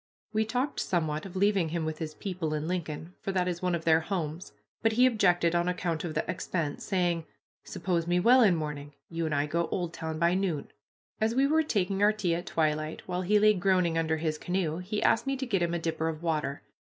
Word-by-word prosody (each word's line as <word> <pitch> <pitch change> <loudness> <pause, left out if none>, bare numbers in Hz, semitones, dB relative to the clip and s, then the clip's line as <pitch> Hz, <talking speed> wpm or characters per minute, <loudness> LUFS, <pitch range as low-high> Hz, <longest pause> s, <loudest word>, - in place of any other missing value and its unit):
We 220 0 +2
talked 255 +5 -1
somewhat 160 -3 -1
of 190 - -12
leaving 195 -3 +2
him 165 0 -2
with 155 0 -4
his 155 -2 -5
people 180 -5 -3
in 150 +1 -3
Lincoln, 170 -1 -4
for 195 - -2
that 180 -1 +1
is 175 -1 -2
one 180 -1 +1
of 165 - -5
their 160 -1 +5
homes, 165 -1 -4 0.3
but 225 -1 +2
he 250 +3 +5
objected 180 -8 +3
on 175 0 +1
account 175 -3 -1
of 165 -3 -4
the - - -1
expense, 170 -3 -3
saying, 175 -4 0 0.4
"Suppose 170 -3 -2
me 175 +1 +2
well 250 +7 +6
in 200 -6 +5
morning, 145 -2 -5 0.2
you 165 -1 -1
and 155 - -1
I 145 0 +1
go 170 +3 -1
Oldtown 165 -3 -3
by 170 +2 +3
noon." 185 -6 -1 0.5
As 220 +2 +1
we 270 +2 +4
were 315 +3 +3
taking 200 -9 0
our 210 +1 +5
tea 195 -5 0
at 175 +1 -3
twilight, 155 -1 -1
while 180 0 -2
he 205 +4 +3
lay 215 +1 +6
groaning 185 -3 +2
under 160 -1 +1
his 155 -1 -2
canoe, 175 -3 -1
he 205 +4 -3
asked 235 +3 +3
me 270 0 0
to 265 - -3
get 200 -7 0
him 170 0 0
a - - +1
dipper 165 -1 -1
of 160 +1 -6
water. 150 -4 -1
175 Hz, 225 wpm, -29 LUFS, 160-195 Hz, 0.5 s, well